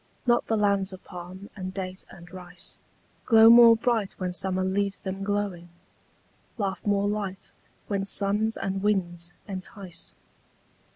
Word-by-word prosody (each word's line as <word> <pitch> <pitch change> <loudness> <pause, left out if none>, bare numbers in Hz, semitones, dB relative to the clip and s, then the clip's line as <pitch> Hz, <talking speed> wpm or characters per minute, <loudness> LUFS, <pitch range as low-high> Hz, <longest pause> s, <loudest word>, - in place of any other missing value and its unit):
Not 240 -1 +2
the 225 - +1
lands 200 -2 +1
of 185 - -11
palm 180 +3 -10
and 185 -2 -5
date 185 -1 -5
and 175 -1 -14
rice 180 -1 -9 0.5
Glow 225 -1 +8
more 235 -1 +9
bright 225 -3 0
when 180 -1 -4
summer 185 0 +1
leaves 200 +1 0
them 195 0 -5
glowing, 200 -4 -2 0.9
Laugh 195 -4 -3
more 200 0 +2
light 200 -2 -4 0.4
when 200 -1 -1
suns 210 +3 +1
and 195 0 -3
winds 175 -4 -1 0.2
entice. 185 -2 -6
195 Hz, 135 wpm, -26 LUFS, 185-205 Hz, 0.9 s, more